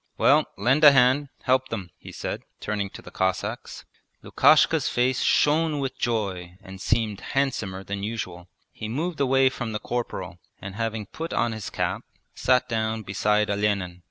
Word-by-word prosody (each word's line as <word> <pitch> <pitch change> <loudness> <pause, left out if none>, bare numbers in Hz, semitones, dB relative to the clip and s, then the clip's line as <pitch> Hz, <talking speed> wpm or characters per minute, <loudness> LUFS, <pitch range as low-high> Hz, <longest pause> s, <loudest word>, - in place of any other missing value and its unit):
Well, - - +4
lend 130 +9 +2
a 145 -2 +10
hand, 135 +2 +4
help 130 0 +2
them,' 100 -6 -5
he - - -11
said, - - -5 0.2
turning 105 -2 -2
to - - -12
the - - -11
Cossacks. 95 0 -3 0.4
Lukashka's - - +4
face 125 +1 +1
shone 155 +1 +3
with 135 -2 -3
joy 95 -6 -2
and 95 -1 -10
seemed 110 -2 0
handsomer 110 -9 -2
than 100 +1 -5
usual. 100 -5 -5 0.2
He 110 - -7
moved 160 +7 -3
away 135 -1 +4
from 120 -3 -5
the 105 - -2
corporal, 95 -8 -4 0.2
and 95 +1 -7
having 110 0 -3
put 165 - -6
on 120 - +1
his 110 -2 -5
cap - - -2 0.3
sat 125 -1 +2
down 110 -1 -1
beside 105 +1 +1
Olenin. 100 -3 -1
110 Hz, 160 wpm, -25 LUFS, 100-130 Hz, 0.4 s, a